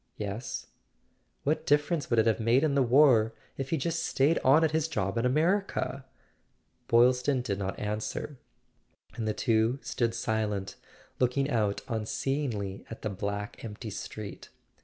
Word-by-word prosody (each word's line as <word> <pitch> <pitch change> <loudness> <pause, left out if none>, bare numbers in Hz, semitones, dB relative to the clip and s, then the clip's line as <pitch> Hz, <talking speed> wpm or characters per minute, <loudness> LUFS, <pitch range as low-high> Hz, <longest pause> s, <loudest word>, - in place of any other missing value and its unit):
"Yes." 105 +3 -4 0.8
"What 150 +3 0
difference 145 +1 +2
would 120 - +2
it 110 - +5
have 115 -1 +2
made 115 +5 +3
in 155 -3 +2
the 140 - +3
war, 120 -4 +5 0.2
if 135 0 -4
he'd 165 - 0
just 170 -1 -1
stayed 145 +5 +2
on 145 +5 +5
at 160 - +3
his 160 0 +1
job 95 -10 -2
in 115 +2 +2
America?" 155 -1 0 0.8
Boylston 125 +2 +4
did 100 -5 -2
not 95 0 -3
answer, 105 +6 -4 0.7
and 110 -1 -3
the 110 - +1
two 115 +2 +2
stood 115 -2 -1
silent, 105 -4 -2 0.4
looking 135 +3 +1
out 105 -4 +1
unseeingly 110 -3 -2
at 115 - -9
the 110 - -1
black 100 +3 -4
empty 110 0 -6
street. 100 +1 -7
120 Hz, 150 wpm, -29 LUFS, 110-140 Hz, 0.8 s, it